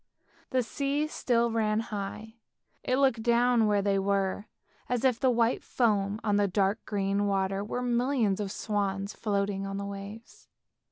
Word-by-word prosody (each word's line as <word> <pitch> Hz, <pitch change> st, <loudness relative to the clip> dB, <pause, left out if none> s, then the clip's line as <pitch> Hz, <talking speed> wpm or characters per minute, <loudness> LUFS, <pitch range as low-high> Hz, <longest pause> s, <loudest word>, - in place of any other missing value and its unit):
The 255 Hz, -1 st, +1 dB
sea 280 Hz, +5 st, -1 dB
still 235 Hz, -6 st, 0 dB
ran 215 Hz, -1 st, +1 dB
high, 215 Hz, +1 st, -6 dB, 0.5 s
it 255 Hz, -, +1 dB
looked 265 Hz, -5 st, +2 dB
from 235 Hz, -1 st, +3 dB
where 205 Hz, -1 st, +2 dB
they 200 Hz, -1 st, +2 dB
were 195 Hz, +1 st, 0 dB, 0.4 s
as 245 Hz, +1 st, 0 dB
if 250 Hz, -3 st, +3 dB
the 260 Hz, -, +3 dB
white 235 Hz, -1 st, +1 dB
foam 210 Hz, -3 st, +1 dB
on 205 Hz, -2 st, +2 dB
the 205 Hz, -1 st, +3 dB
dark 195 Hz, +2 st, 0 dB
green 200 Hz, 0 st, 0 dB
water 195 Hz, 0 st, 0 dB
were 245 Hz, +4 st, -3 dB
millions 240 Hz, -4 st, +1 dB
of 200 Hz, -2 st, -3 dB
swans 200 Hz, -1 st, -2 dB
floating 200 Hz, -2 st, -1 dB
on 195 Hz, 0 st, -4 dB
the 200 Hz, -, -4 dB
waves. 200 Hz, +3 st, -9 dB
210 Hz, 160 wpm, -29 LUFS, 200-235 Hz, 0.5 s, from